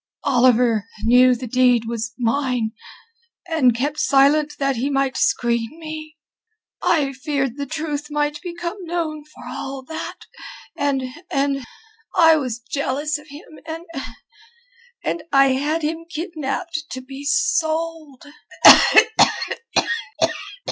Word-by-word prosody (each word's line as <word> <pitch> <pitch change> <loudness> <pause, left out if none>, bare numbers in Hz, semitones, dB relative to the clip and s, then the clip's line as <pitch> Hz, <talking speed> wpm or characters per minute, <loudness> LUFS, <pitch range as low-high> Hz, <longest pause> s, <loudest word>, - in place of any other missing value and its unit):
Oliver 240 -4 +3 0.2
knew 250 +2 +5
the 250 +2 -6
deed 245 -1 +3
was 230 0 -4
mine, 245 -2 0 0.8
and 285 -8 +3
kept 290 +4 -2
silent 285 +3 +3
that 275 -2 0
he 260 +5 -1
might 275 -1 0
screen 235 +4 0
me. 310 -1 -8 0.6
I 290 -5 +1
feared 270 -2 -2
the 280 0 -5
truth 300 0 -4
might 295 0 -1
become 345 +1 -5
known 325 -3 -3
for 305 - -15
all 270 0 -6
that... 320 +5 -6 0.6
and... 280 -2 0 0.3
and 275 -1 0 0.5
I 325 -1 +6
was 255 -6 -3
jealous 280 +5 -2
of 300 - -17
him, 300 +1 -13
and... 330 +1 -7 1.2
and 335 - -2
I 275 -1 +5
had 295 +5 0
him 325 +2 -3
kidnapped 320 0 -4
to 260 - -5
be 270 +2 -10
sold...." 320 - -1
285 Hz, 115 wpm, -21 LUFS, 255-315 Hz, 1.2 s, I